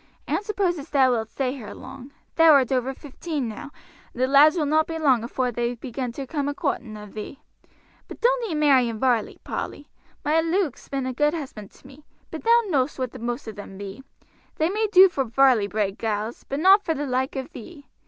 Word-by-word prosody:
I - - -7
don't - - 0
suppose 385 -5 -1
as 285 - -10
thou 265 -3 +4
wilt 225 -2 -1
stay 260 0 -2
here 225 -7 -9
long; 265 0 -11 0.2
thou 325 -1 +6
art 270 -3 +4
over 260 0 0
fifteen 290 0 -5
now, 225 +6 -7 0.4
and 250 - -2
the - - +5
lads 290 +5 +6
will 310 - +1
not 310 +2 +2
be 325 - -4
long 265 -7 +3
afore 250 +1 -2
they 240 +1 -2
begin 250 +1 -5
to 275 +2 -6
come 285 +1 -3
a 290 - -2
coorting 235 -9 -3
of 210 -1 -11
thee. 215 +6 -7 0.7
But - - -10
doan't - - +1
ee 325 - -2
marry 275 -5 +4
in 225 - -5
Varley, 240 -2 0
Polly. 290 - -6 0.4
My 310 +2 +3
Luke's 330 -3 -2
been 270 -1 -2
a 260 - -3
good 295 +5 +1
husband 255 -10 -7
to - - -22
me. 275 +3 -15 0.3
But - - -7
thou 470 +1 +5
know'st 285 -7 0
what 255 -2 -3
the - - -10
most 240 0 -4
of 220 - -7
them 200 -1 -9
be 200 +5 -8 0.5
they 320 +3 0
may 430 +2 0
do 380 -1 +9
for 285 -7 -1
Varley 250 -3 +3
bred 205 0 -2
gals, 220 +1 -3
but 275 - -2
not 385 +5 +6
for 325 -2 -1
the 290 - -3
like 260 +1 -1
of 265 -1 -5
thee. 285 +4 -11
270 Hz, 225 wpm, -24 LUFS, 240-310 Hz, 0.7 s, do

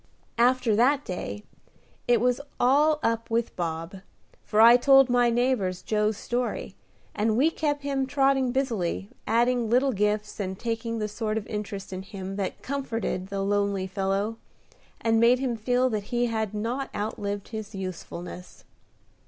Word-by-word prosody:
After 245 -2 +3
that 275 +6 +3
day 105 - -5 0.6
it 240 -1 +4
was 250 +3 +1 0.2
all 295 +5 +4
up 230 0 0
with 230 0 -1
Bob, 165 +1 -4 0.5
for 210 - 0
I 230 +2 +9
told 270 0 +6
my 245 -1 +4
neighbors 235 -7 0
Joe's 210 -1 0
story, 245 +2 -3 0.4
and 220 +1 +1
we 300 +6 +4
kept 290 -3 -1
him 275 -2 -1
trotting 270 -2 +2
busily, 205 - -1 0.2
adding 235 +1 +2
little 255 +4 +3
gifts, 210 0 -1
and 190 -1 -3
taking 230 +1 -3
the 215 -1 -1
sort 215 +1 -3
of 215 - -3
interest 205 -3 -5
in 185 - -4
him 195 0 -7
that 195 -2 -4
comforted 230 -8 -3
the 195 0 -3
lonely 200 -1 0
fellow, 195 +3 -1 0.6
and 225 0 +2
made 235 +2 +5
him 255 -2 -1
feel 245 +3 +1
that 210 -2 -2
he 240 +2 0
had 220 -3 -2
not 240 +6 -2
outlived 205 -1 -3
his 220 -2 -6
usefulness. 180 -1 -7
225 Hz, 155 wpm, -26 LUFS, 200-250 Hz, 0.6 s, I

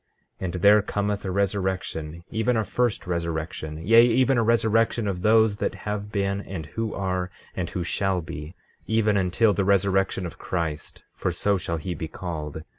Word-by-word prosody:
15:21 - - -3
And 85 - -3
there 105 +1 +7
cometh 100 0 -2
a - - -2
resurrection, 95 -4 -2
even 115 +2 +1
a 110 - +2
first 120 -2 0
resurrection; 80 -2 -3
yea, 115 +3 +8
even 130 +3 +3
a - - +3
resurrection 115 0 +2
of 90 -3 -2
those 110 0 +4
that - - -1
have 105 0 -3
been, 100 -1 0
and 95 -6 -6
who 110 +7 -4
are, 95 -2 -1 0.3
and 90 -2 -2
who 90 - -3
shall 95 +2 0
be, 80 0 -7 0.3
even 110 -1 +2
until 100 +3 +3
the 100 - 0
resurrection 95 -1 +2
of 85 - -8
Christ—for 80 -4 -4
so 100 0 +1
shall 85 -3 -2
he 90 +3 -4
be 80 0 -5
called. 80 -3 -6
95 Hz, 175 wpm, -25 LUFS, 85-105 Hz, 0.3 s, yea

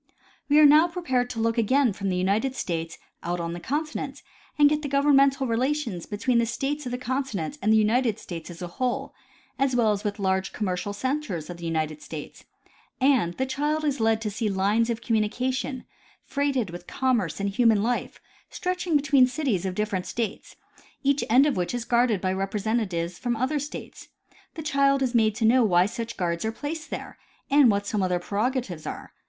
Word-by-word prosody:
We 290 - +5
are 305 - +8
now 305 +4 +7
prepared 265 -9 -1
to 240 -2 -5
look 230 +1 +1
again 250 +1 +3
from 195 0 -3
the 185 - 0
United 205 +8 0
States 165 -5 -3 0.2
out 175 +1 -2
on 170 0 -3
the 175 - -6
continent 300 - -4 0.3
and 295 -1 +7
get 300 +1 +1
the 295 - -3
governmental 275 -1 +4
relations 245 - -1
between 235 +4 +1
the 230 - +1
states 280 +4 -2
of - - -4
the 250 - -2
continent 260 - -3
and 215 - +2
the 220 - +6
United 225 +1 +2
States 170 -5 -8
as 175 0 -8
a - - -3
whole, 255 +8 -2 0.5
as 270 -2 +2
well 230 -3 +3
as 205 -1 -2
with 205 -1 -2
large 190 -1 0
commercial 185 -2 -2
centers 205 - -3
of 175 - -8
the 170 -1 -6
United 155 -2 -2
States, 155 -2 -9 0.5
and 255 -11 +3
the 265 - -1
child 295 +4 -1
is 285 -3 0
led 225 0 +2
to 215 -1 -2
see 215 +1 -1
lines 205 +4 +1
of 230 -1 -2
communication, 250 +4 -1 0.4
freighted 275 - -1
with 175 - -9
commerce 240 -11 0
and 200 0 0
human 220 -1 +3
life, 245 +2 -2 0.3
stretching 360 -2 -2
between 275 -3 +5
cities 250 - -1
of 185 - -4
different 205 -3 -2
states, 225 -3 -4 0.5
each 280 +1 +2
end 255 +5 +6
of 295 - +1
which 180 +6 -1
is 240 -1 -3
guarded 235 -3 +2
by 185 0 -1
representatives 195 -3 -2
from 240 -1 -1
other 260 +6 0
states. 290 +2 -8 0.5
The 320 - -6
child 275 -2 +2
is 255 -1 -1
made 220 -3 +3
to 225 0 0
know 245 +3 +5
why 180 -4 +4
such 230 +2 -5
guards 170 -2 -1
are 220 - -1
placed 305 +6 -6
there - - -7 0.3
and 280 -3 +6
what 200 -1 +1
some 205 0 -1
of 185 - +1
their 180 - +1
prerogatives 205 - -2
are. - - -7
230 Hz, 195 wpm, -26 LUFS, 195-270 Hz, 0.5 s, are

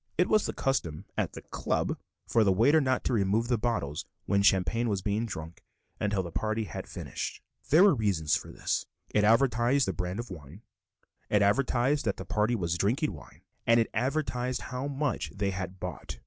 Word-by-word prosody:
It 180 +2 +4
was 215 -1 +3
the - - -3
custom 90 - -1
at - - -1
the - - -9
"Club" - - -1 0.3
for 115 - +3
the 100 - +4
waiter 135 +11 +5
not 130 -2 +1
to - - 0
remove 110 +2 +1
the 120 - +3
bottles 90 - -1 0.2
when 100 0 +2
champagne 100 +4 +3
was 100 -3 -1
being 105 +3 0
drunk 80 -4 -7 0.4
until 100 -2 0
the 85 - -7
party 110 +5 -1
had 90 - -6
finished. - - -5 0.3
There 160 +6 +7
were 200 -3 +7
reasons 100 - +1
for - - -5
this; - - -2 0.2
it 105 - +3
advertised 120 +3 +3
the 95 - 0
brand 90 +3 -3
of 120 -3 -6
wine, 80 - -10 0.7
it 105 -1 +4
advertised 125 +6 +2
that 100 -3 0
the - - -6
party 110 +3 +1
was 85 -4 -1
drinking 130 - +1
wine, - - -14 0.2
and 115 -1 +5
advertised 125 0 -1
how 130 +2 -2
much 140 -2 -1
they 100 -1 0
had 95 -1 -5
bought. 90 -4 -6
110 Hz, 190 wpm, -29 LUFS, 95-125 Hz, 0.7 s, There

